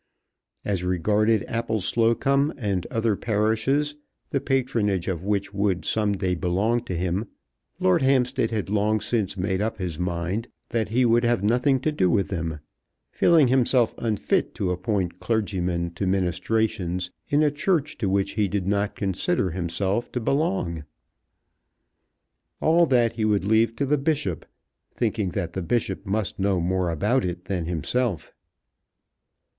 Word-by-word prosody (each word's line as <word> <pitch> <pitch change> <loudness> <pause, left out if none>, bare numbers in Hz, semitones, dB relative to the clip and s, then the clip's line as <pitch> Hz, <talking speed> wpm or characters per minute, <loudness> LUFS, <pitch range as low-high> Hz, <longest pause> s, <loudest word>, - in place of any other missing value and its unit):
As 95 -4 -1
regarded 105 +5 +2
Appleslocombe 115 - +1
and 100 -8 -2
other 115 -2 +1
parishes, 115 +8 0 0.3
the 140 - 0
patronage 115 -9 0
of 90 -3 -2
which 100 0 -1
would 100 -2 0
some 105 -2 +1
day 95 -2 -1
belong 100 +7 0
to 90 - -4
him, 90 +5 -1 0.5
Lord 185 -3 +3
Hampstead 130 -3 +2
had 105 -3 -3
long 105 +1 +2
since 105 -4 -1
made 95 +1 -1
up 110 +1 -2
his 90 -4 -4
mind 90 +5 -2 0.2
that 115 -3 -1
he 125 +3 +2
would 120 +1 +3
have 120 -4 +1
nothing 125 +5 +2
to 155 - 0
do 95 -11 +2
with 95 +3 +1
them, 80 -4 -3 0.5
feeling 160 -5 +4
himself 125 -2 +3
unfit 110 -4 0
to 95 -3 -1
appoint 90 -1 -2
clergymen 90 -6 -1
to 95 +3 -3
ministrations 90 -1 0 0.2
in 150 +1 +3
a 150 - +3
Church 150 0 0
to 100 -5 0
which 100 0 +1
he 105 -1 +1
did 100 -1 -2
not 100 +1 0
consider 95 - 0
himself 95 +6 -1
to 125 - -1
belong. 95 - -1 1.8
All 170 +2 +4
that 120 -4 +3
he 110 - -3
would 105 -3 +1
leave 110 +2 +3
to 140 - -1
the 145 +1 +1
Bishop, 140 - -1 0.4
thinking 110 -4 -1
that 85 -4 -2
the 95 - -3
Bishop 95 0 -1
must 100 0 -2
know 95 -1 +1
more 90 +1 0
about 105 - +1
it 90 0 -4
than 90 -4 -2
himself. 90 - -2
105 Hz, 150 wpm, -24 LUFS, 95-120 Hz, 1.8 s, feeling